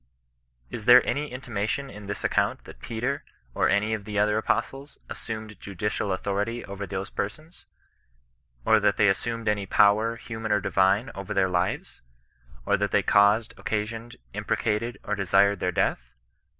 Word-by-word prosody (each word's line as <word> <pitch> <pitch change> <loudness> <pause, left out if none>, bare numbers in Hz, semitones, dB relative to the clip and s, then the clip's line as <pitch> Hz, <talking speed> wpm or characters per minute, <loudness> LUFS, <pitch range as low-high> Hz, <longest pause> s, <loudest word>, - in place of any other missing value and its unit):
Is 110 - -6
there 125 +1 +8
any 145 -1 -2
intimation 125 +1 -3
in 105 0 -10
this 100 - -4
ac - - 0
count, - - +1
that - - -13
Peter, 125 +5 -3 0.3
or - - +2
any 105 +2 +2
of 105 -2 -3
the 105 0 -5
other 105 +1 +3
apostles, 135 +5 -2
assumed 110 -1 -7
judicial 100 +1 -3
authority 100 +5 -2
over 100 0 -6
those 95 +2 -5
persons? 155 - -6 1.0
Or - - +5
that - - +2
they 105 - +5
as 95 - +2
sumed 115 -1 -4
any 105 -2 0
power, 110 +3 +4
human 115 -2 -5
or 105 - +4
divine, 95 +5 +2
over 100 +1 -6
their 95 -1 +3
lives? 90 0 -2 0.6
Or - - +2
that - - 0
they - - +2
caused, 105 +3 +4
occasioned, 110 +3 -3 0.2
imprecated, 105 +2 -1
or 105 - -3
desired 100 0 +3
their 90 - 0
death - - +1
105 Hz, 165 wpm, -26 LUFS, 100-115 Hz, 1.0 s, there